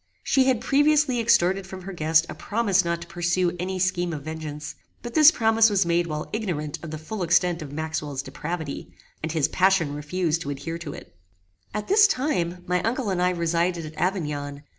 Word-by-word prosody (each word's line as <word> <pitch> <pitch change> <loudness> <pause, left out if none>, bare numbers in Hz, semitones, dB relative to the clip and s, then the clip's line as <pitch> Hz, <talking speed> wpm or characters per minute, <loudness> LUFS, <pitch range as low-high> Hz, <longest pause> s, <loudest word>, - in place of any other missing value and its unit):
She 265 -1 +3
had 255 -4 +2
previously 290 -1 +3
extorted 190 -4 +2
from 190 -1 -9
her 195 +1 -7
guest 160 -1 +3
a - - -6
promise 205 -4 +1
not 170 0 -2
to - - -14
pursue 175 +1 0
any 185 +1 -3
scheme 180 -2 0
of 145 -3 -6
vengeance; 155 -1 -6 0.3
but 240 -1 -6
this 305 +1 +8
promise 225 -5 +4
was 200 -3 +2
made 170 0 +1
while 155 -1 -4
ignorant 170 -9 -3
of 165 - -6
the 155 - -5
full 190 +7 -6
extent 175 0 +2
of 145 -3 -7
Maxwell's 150 -2 -4
depravity, 150 +2 -5 0.3
and 160 - -3
his 155 -3 +1
passion 185 -6 +2
refused 160 +2 -1
to 140 - -5
adhere 165 +4 -5
to 155 -4 -6
it. 85 - -12 0.6
At 210 - -4
this 410 +1 +6
time 180 - -1
my 180 0 0
uncle 230 -1 -1
and 180 -1 -1
I 180 - +3
resided 170 -1 0
at 155 - -8
Avignon. 150 -6 -2
175 Hz, 195 wpm, -25 LUFS, 155-195 Hz, 0.6 s, this